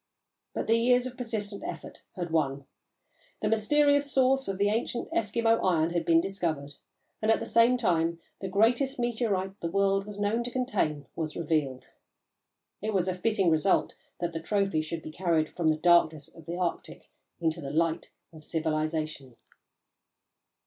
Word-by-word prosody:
But -, -, -2 dB
the 225 Hz, +1 st, +3 dB
years 245 Hz, +1 st, +3 dB
of 255 Hz, 0 st, -6 dB
persistent 220 Hz, -5 st, -4 dB
effort -, -, -7 dB
had 175 Hz, -3 st, -4 dB
won. 140 Hz, -3 st, 0 dB, 0.8 s
The -, -, +2 dB
mysterious 285 Hz, +6 st, +3 dB
source 270 Hz, 0 st, +3 dB
of 195 Hz, -1 st, -2 dB
the 200 Hz, +1 st, +2 dB
ancient 230 Hz, +2 st, -2 dB
Eskimo 230 Hz, +1 st, +1 dB
iron 165 Hz, -3 st, +2 dB
had 170 Hz, -1 st, -1 dB
been 165 Hz, 0 st, +5 dB
discovered, 165 Hz, -6 st, -3 dB, 0.5 s
and, 215 Hz, -, 0 dB
at 225 Hz, -, +4 dB
the -, -, -4 dB
same 235 Hz, +2 st, +4 dB
time, 170 Hz, -7 st, +1 dB, 0.2 s
the 195 Hz, -, -4 dB
greatest 235 Hz, +8 st, +2 dB
meteorite 215 Hz, -5 st, -1 dB
the 170 Hz, -, -3 dB
world 195 Hz, +2 st, +1 dB
was 205 Hz, -1 st, -8 dB
known 210 Hz, +3 st, 0 dB
to 245 Hz, -, -4 dB
contain 240 Hz, -, -1 dB
was 155 Hz, -2 st, -4 dB
revealed. 145 Hz, -6 st, -1 dB, 0.9 s
It 215 Hz, 0 st, -2 dB
was 185 Hz, -1 st, +1 dB
a 185 Hz, -, +1 dB
fitting 190 Hz, -1 st, +1 dB
result 160 Hz, +5 st, +2 dB, 0.3 s
that 170 Hz, -1 st, -2 dB
the 165 Hz, -, -3 dB
trophy 195 Hz, -3 st, 0 dB
should 160 Hz, +1 st, -5 dB
be 155 Hz, -, -7 dB
carried 165 Hz, -2 st, +1 dB
from 170 Hz, -2 st, -1 dB
the 155 Hz, -1 st, +3 dB
darkness 160 Hz, -2 st, +3 dB
of 165 Hz, -1 st, -16 dB
the 170 Hz, +1 st, -4 dB
Arctic 180 Hz, -2 st, -4 dB, 0.3 s
into 165 Hz, 0 st, -1 dB
the 140 Hz, -, -5 dB
light 165 Hz, +3 st, 0 dB, 0.2 s
of 155 Hz, -1 st, -13 dB
civilisation. 155 Hz, -4 st, -2 dB
185 Hz, 165 wpm, -28 LUFS, 160-225 Hz, 0.9 s, been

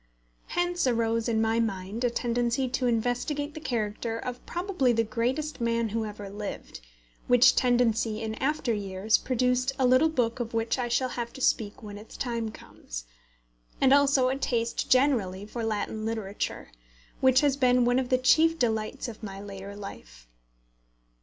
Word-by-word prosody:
Hence 350 Hz, -3 st, 0 dB
arose 230 Hz, -1 st, +1 dB
in 225 Hz, -1 st, +1 dB
my 225 Hz, +1 st, +2 dB
mind 205 Hz, 0 st, -2 dB
a 245 Hz, -, +3 dB
tendency 240 Hz, +2 st, 0 dB
to 255 Hz, 0 st, 0 dB
investigate 245 Hz, +6 st, -1 dB
the 310 Hz, -, -7 dB
character 225 Hz, -4 st, -2 dB
of 245 Hz, +1 st, -6 dB
probably 350 Hz, -8 st, 0 dB
the 230 Hz, 0 st, +2 dB
greatest 245 Hz, +7 st, -2 dB
man 230 Hz, -1 st, +1 dB
who 220 Hz, +1 st, -2 dB
ever 205 Hz, -1 st, -7 dB
lived, 200 Hz, -, -7 dB, 0.5 s
which 245 Hz, +1 st, +6 dB
tendency 230 Hz, -3 st, +2 dB
in 220 Hz, -1 st, -3 dB
after 275 Hz, -3 st, 0 dB
years 200 Hz, +1 st, +1 dB
produced 250 Hz, +1 st, +1 dB
a 260 Hz, -, +2 dB
little 255 Hz, +6 st, +5 dB
book 245 Hz, -6 st, 0 dB
of 235 Hz, -1 st, -4 dB
which 225 Hz, +3 st, 0 dB
I 245 Hz, -, 0 dB
shall 255 Hz, +2 st, +1 dB
have 235 Hz, -1 st, -4 dB
to 265 Hz, -, -9 dB
speak 210 Hz, -4 st, 0 dB
when 205 Hz, -1 st, -8 dB
its 215 Hz, -, -12 dB
time 235 Hz, -3 st, -2 dB
comes, -, -, -9 dB, 0.7 s
and 270 Hz, 0 st, +5 dB
also 275 Hz, -2 st, +4 dB
a 265 Hz, -, -1 dB
taste 235 Hz, -4 st, -1 dB
generally 235 Hz, -8 st, +2 dB
for 230 Hz, +2 st, -5 dB
Latin 215 Hz, 0 st, -2 dB
literature, 215 Hz, -, -4 dB, 0.5 s
which 260 Hz, 0 st, +5 dB
has 285 Hz, -2 st, +3 dB
been 250 Hz, -2 st, +3 dB
one 245 Hz, +1 st, +3 dB
of 255 Hz, -1 st, -3 dB
the 255 Hz, -, +4 dB
chief 320 Hz, +6 st, +4 dB
delights 225 Hz, 0 st, -1 dB
of 230 Hz, -2 st, -9 dB
my 195 Hz, -3 st, -7 dB
later 200 Hz, 0 st, -8 dB
life. -, -, -10 dB
235 Hz, 165 wpm, -27 LUFS, 220-255 Hz, 0.7 s, which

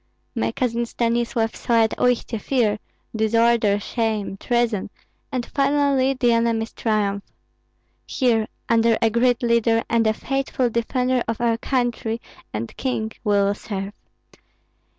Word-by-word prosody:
My 115 Hz, +1 st, -1 dB
cousin 235 Hz, -, -1 dB
Stanislav 235 Hz, -1 st, 0 dB
saw 230 Hz, -2 st, +2 dB
at 220 Hz, -, +1 dB
Uistsie 245 Hz, -2 st, +1 dB
fear, 220 Hz, -6 st, +1 dB, 0.4 s
disorder, 220 Hz, -1 st, +3 dB
shame, 215 Hz, -2 st, -2 dB
treason, 235 Hz, -2 st, 0 dB, 0.4 s
and 250 Hz, -2 st, -2 dB
finally 275 Hz, -1 st, +2 dB
the 245 Hz, -2 st, +3 dB
enemy's 230 Hz, -1 st, 0 dB
triumph. 205 Hz, -3 st, 0 dB, 0.8 s
Here 230 Hz, -4 st, +1 dB, 0.2 s
under 230 Hz, 0 st, +3 dB
a 225 Hz, -1 st, +2 dB
great 245 Hz, +2 st, +2 dB
leader 230 Hz, -1 st, +2 dB
and 230 Hz, -1 st, +3 dB
a 220 Hz, -, +3 dB
faithful 270 Hz, -2 st, -1 dB
defender 250 Hz, +2 st, 0 dB
of 230 Hz, -1 st, -2 dB
our 235 Hz, -1 st, +2 dB
country 240 Hz, -3 st, -1 dB, 0.3 s
and 110 Hz, +2 st, -5 dB
king 225 Hz, -4 st, -2 dB
we 210 Hz, -3 st, +2 dB
will 200 Hz, 0 st, +3 dB
serve. 200 Hz, -1 st, -5 dB
230 Hz, 130 wpm, -22 LUFS, 220-245 Hz, 0.8 s, disorder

